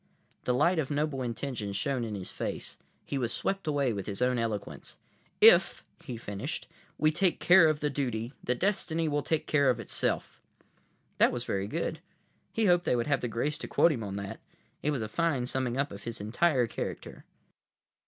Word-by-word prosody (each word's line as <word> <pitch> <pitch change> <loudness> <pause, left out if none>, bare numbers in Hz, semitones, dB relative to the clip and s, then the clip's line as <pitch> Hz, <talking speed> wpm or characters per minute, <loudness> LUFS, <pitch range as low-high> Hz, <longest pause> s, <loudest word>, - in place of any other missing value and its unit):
The 125 - +2
light 170 +6 +3
of 140 - -1
noble 145 -2 -1
intention 115 -4 -3
shone 125 +5 -1
in 110 -2 -4
his 95 -2 -5
face. - - -4 0.3
He 140 - -2
was 120 -2 -1
swept 195 +4 -2
away 140 -5 +1
with 100 -2 -5
his 100 -2 -4
own 125 0 +2
eloquence. 110 -3 -4 0.4
"If," - - +6 0.2
he 120 - -6
finished, 100 -3 -5 0.3
"we 155 +1 +3
take 180 +3 +1
care 175 -2 +7
of 155 -1 -1
the 150 - +1
duty, 120 -3 -2
the 125 - +1
destiny 165 -1 0
will 145 -1 0
take 160 +1 -1
care 140 -3 +3
of 125 -2 +1
itself!" 115 - -2 0.8
That - - +6
was - - -3
very 100 0 -1
good. - - -2 0.5
He 225 - +1
hoped 175 -2 +4
they - - +2
would 120 - 0
have 145 -2 +1
the 120 - -1
grace 120 +6 -2
to - - -5
quote 170 - +4
him 130 -7 -2
on 100 -1 -5
that. 100 -1 -5 0.4
It 150 - 0
was 135 -6 -1
a - - -3
fine 145 0 0
summing 125 -1 -1
up 140 +1 0
of 100 0 -8
his 115 +2 -6
entire 125 +5 +2
character. 115 - -6
130 Hz, 195 wpm, -29 LUFS, 115-150 Hz, 0.8 s, care